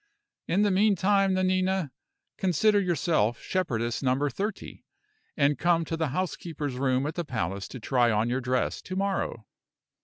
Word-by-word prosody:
In 190 +5 +2
the 205 - +3
meantime, 195 -1 +3
Nanina, 185 -3 +1 0.4
consider 205 +3 +2
yourself 155 - +1
Shepherdess 120 -11 -2
Number 135 +2 +1
Thirty, 205 +1 -5 0.5
and 145 -1 +2
come 170 -1 +2
to 165 - -3
the 160 -1 -1
housekeeper's 160 -2 -3
room 130 +1 0
at 150 - -2
the 175 - -3
palace 95 - -3
to 130 - -8
try 120 +1 +2
on 110 +1 +1
your 125 +2 -1
dress 125 0 -1
to 185 - -6
morrow. 195 - -2
165 Hz, 150 wpm, -27 LUFS, 130-185 Hz, 0.5 s, the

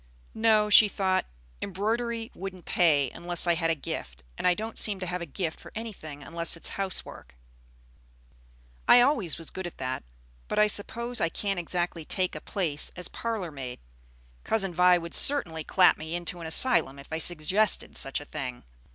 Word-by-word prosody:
"No," 220 -1 +3
she 210 +1 +8
thought; 190 -2 0 0.3
"embroidery 225 +4 -2
wouldn't 185 -2 -8
pay 145 -7 +2
unless 175 0 +1
I 175 - +3
had 165 0 -1
a 165 - +2
'gift'; - - -7
and - - -1
I 180 - +4
don't 220 +4 -4
seem 205 -3 +3
to 185 - -4
have 180 0 -4
a 170 - -5
gift 160 +2 -4
for - - -13
anything 175 -11 -7
unless 170 +1 -1
it - - -17
is - - +2
housework. 190 - -4 1.5
I 245 - +8
always 245 - +1
was 165 -1 -4
good 190 -1 -5
at 175 - -11
that; 130 0 -4 0.4
but - - -4
I 210 - +6
suppose 235 +4 -1
I 165 - +2
can't 195 +2 -2
exactly 175 -1 -3
take 185 +3 -2
a - - -7
place 165 -8 0
as 180 - -4
parlor 220 -7 -4
maid. 130 -4 -7 0.6
Cousin 195 -5 0
Vi 180 +1 +5
would 170 -1 -7
certainly 170 - +4
clap 185 +3 +4
me 160 +2 -5
into 175 0 -4
an 165 - -6
asylum 160 - +3
if 140 - -13
I 160 - -2
suggested 175 +6 +3
such 135 - -1
a 145 - -11
thing. 130 - -6
180 Hz, 185 wpm, -27 LUFS, 160-210 Hz, 1.5 s, she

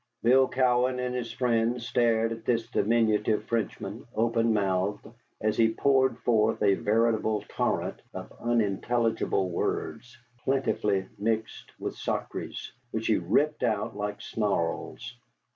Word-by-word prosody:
Bill 130 +3 +5
Cowan 125 0 +2
and 125 0 -2
his 120 -2 -3
friends 115 -1 0
stared 115 -2 +2
at 115 0 -6
this 115 -1 0
diminutive 110 -1 +2
Frenchman, 110 -1 -3
open 115 0 +2
mouthed, 100 -1 0 0.3
as 110 0 0
he 115 -1 +3
poured 130 -1 +3
forth 110 -2 +2
a 100 -1 +5
veritable 110 0 +1
torrent - - -1
of - - -8
unintelligible 115 -3 0
words, 120 +7 -3 0.3
plentifully 105 -8 0
mixed 110 +1 -3
with - - -3
sacrés, - - -4 0.2
which 110 -1 -3
he 110 - +3
ripped 145 - +1
out 105 -2 0
like 105 0 -3
snarls. 85 - -2
115 Hz, 125 wpm, -28 LUFS, 105-120 Hz, 0.3 s, Bill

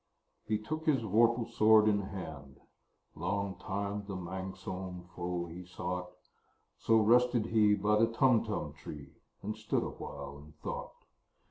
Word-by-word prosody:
He 110 - +2
took 155 +10 -5
his 135 -6 +3
vorpal 115 +3 +3
sword 110 0 +5
in 100 -1 +3
hand: 75 -9 -8 0.5
Long 100 +3 -2
time 100 +1 -3
the 100 - -4
manxome 95 0 -6
foe 90 0 -2
he 85 +2 -8
sought 90 0 -4 0.7
So 115 - +4
rested 120 +1 +4
he 105 -2 +4
by 105 +1 +2
the 115 - +5
Tumtum 115 0 +2
tree, 75 -2 -9 0.3
And 105 +2 -3
stood 110 -1 -1
awhile 70 - -7
in 75 +1 -15
thought. 75 - -7
100 Hz, 135 wpm, -32 LUFS, 90-110 Hz, 0.7 s, sword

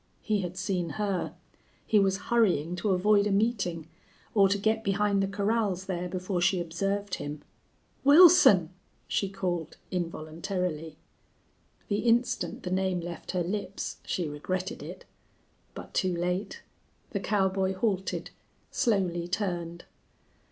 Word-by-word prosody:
He 210 -2 +1
had 180 0 -5
seen 185 -2 -1
her; 200 -3 -1 0.5
he 215 - +4
was 195 -1 +2
hurrying 180 -8 +2
to 195 +4 -1
avoid 200 +2 +4
a - - 0
meeting, 195 -6 0 0.5
or 195 -3 +5
to 200 - +2
get 220 +2 +1
behind 200 0 +1
the 195 - +1
corrals 200 -1 0
there 180 -1 -3
before 185 0 -2
she 185 +1 +3
observed 195 +4 -2
him. 145 +1 -4 0.6
"Wilson!" 285 - +7 0.4
she 195 - 0
called, 180 -4 -3
involuntarily. 165 -1 -3 0.9
The 205 0 0
instant 240 +1 +1
the 180 - -4
name 190 -1 +1
left 170 -1 -7
her 180 -1 +1
lips 195 +2 -4
she 175 -3 -2
regretted 185 +6 -4
it. - - -9 0.7
But - - -9
too 185 -2 +1
late! 180 +3 -2 0.5
The 200 - -1
cowboy 190 -1 +1
halted, 190 -2 -1 0.4
slowly 180 -6 +1
turned. 175 -3 -3
190 Hz, 130 wpm, -28 LUFS, 175-205 Hz, 0.9 s, Wilson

